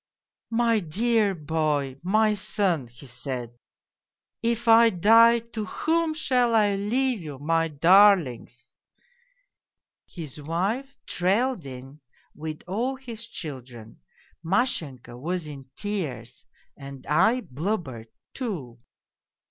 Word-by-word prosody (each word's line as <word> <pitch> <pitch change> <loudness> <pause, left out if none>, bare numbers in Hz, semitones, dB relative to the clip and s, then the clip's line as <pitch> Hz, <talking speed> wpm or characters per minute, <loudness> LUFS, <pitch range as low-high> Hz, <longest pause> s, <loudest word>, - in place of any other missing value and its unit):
" - - -67
' - - -64
My 230 -2 +3
dear 210 +4 +1
boy, 150 -4 -1
my 215 +4 +2
son,' 190 - 0
he 120 +4 -15
said, 125 -1 -5 0.5
' - - -66
if 235 0 -4
I 230 0 +7
die, 225 +5 +6 0.2
to 215 -2 -3
whom 325 +5 0
shall 250 -6 +2
I 210 -2 +4
leave 235 +3 0
you, 150 -4 -7
my 165 +3 +1
darlings? 170 - +3 0.5
' - - -41
" - - -65 0.2
His 155 -4 -9
wife 200 - -2
trailed 195 - 0
in 135 +3 -10 0.3
with 155 0 -7
all 235 +8 -1
his 235 -4 -8
children; 125 - -9 0.4
Mashenka 160 - -1
was 175 +4 -3
in 140 -3 -10
tears 200 -10 -5 0.3
and 140 -1 -10
I 225 +11 +3
blubbered, 140 - -4 0.3
too. 155 - -5
180 Hz, 120 wpm, -25 LUFS, 140-230 Hz, 0.5 s, I